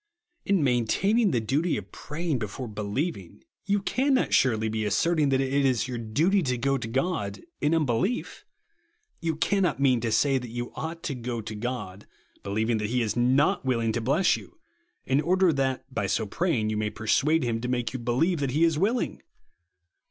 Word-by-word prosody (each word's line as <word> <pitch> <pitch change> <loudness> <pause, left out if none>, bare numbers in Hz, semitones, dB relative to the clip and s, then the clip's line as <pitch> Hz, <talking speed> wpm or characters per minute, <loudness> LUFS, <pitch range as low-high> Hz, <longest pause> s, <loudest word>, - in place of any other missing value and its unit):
In 195 -5 +2
maintaining 195 - +2
the 125 - +1
duty 145 +10 0
of - - -8
praying 150 -2 -3
before 110 +4 -5
believing, 105 - -4 0.2
you 200 0 +1
cannot 265 +4 +1
surely 110 -4 +3
be 110 0 -2
asserting 145 - +2
that 135 -1 +2
it 135 0 -2
is 125 -3 +1
your 125 -2 -4
duty 155 - +2
to 125 -6 -1
go 135 +3 0
to 115 - -5
God 125 - -2 0.2
in 150 +3 +2
unbelief? 165 - -1 0.8
You 165 -2 -1
can 195 +5 +1
not 165 -8 +1
mean 130 -3 +3
to 115 -1 -1
say 135 +3 +3
that 125 -1 -8
you 120 +1 -5
ought 165 +1 -6
to 145 - -2
go 120 -1 -4
to 110 +1 -7
God, 105 -3 -5 0.3
believing 110 +3 0
that 105 0 -2
he 125 0 +1
is 110 - -2
not 135 +10 +2
willing 115 -4 +1
to 115 - -2
bless 140 +11 +3
you, 360 - -11 0.5
in 135 +2 +2
order 185 +1 +3
that 135 -2 -1
by 100 - -1
so 105 +3 0
praying 115 - 0
you 105 - -2
may 105 0 0
persuade 140 +10 +1
him 115 -2 -1
to 125 - -3
make 120 -2 -1
you 130 - -3
believe 135 +9 +1
that 140 -2 0
he 155 +3 +2
is 165 -2 +3
willing. 225 +7 0
130 Hz, 190 wpm, -26 LUFS, 115-165 Hz, 0.8 s, surely